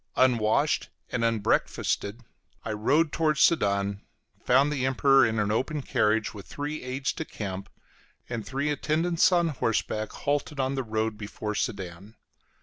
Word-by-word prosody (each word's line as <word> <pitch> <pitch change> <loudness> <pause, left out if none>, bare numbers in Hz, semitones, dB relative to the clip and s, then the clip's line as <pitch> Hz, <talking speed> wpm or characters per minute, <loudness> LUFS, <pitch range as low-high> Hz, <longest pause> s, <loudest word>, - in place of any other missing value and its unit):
Unwashed 125 +3 +2 0.2
and 120 -2 -1
unbreakfasted, 110 0 0 0.4
I 110 - -2
rode 145 +9 +2
towards 155 -3 +1
Sedan, 100 -8 +2 0.4
found 135 +4 +4
the 135 -3 -2
Emperor 135 +1 +4
in 110 0 -2
an 105 -1 +1
open 135 +6 -1
carriage, 105 -2 +1
with 100 -3 -10
three 150 +2 -4
aides 130 +2 -2
de - - -4
camp 100 -8 -6 0.6
and 120 -2 -4
three 135 +8 -2
in - - +2
attendance 165 +5 +2
on 175 -2 +3
horseback, 110 -5 -1
halted 145 0 -2
on 135 0 0
the 135 - -1
road 110 -2 -2
before 105 0 -4
Sedan. 100 -1 -4
125 Hz, 145 wpm, -27 LUFS, 105-145 Hz, 0.6 s, found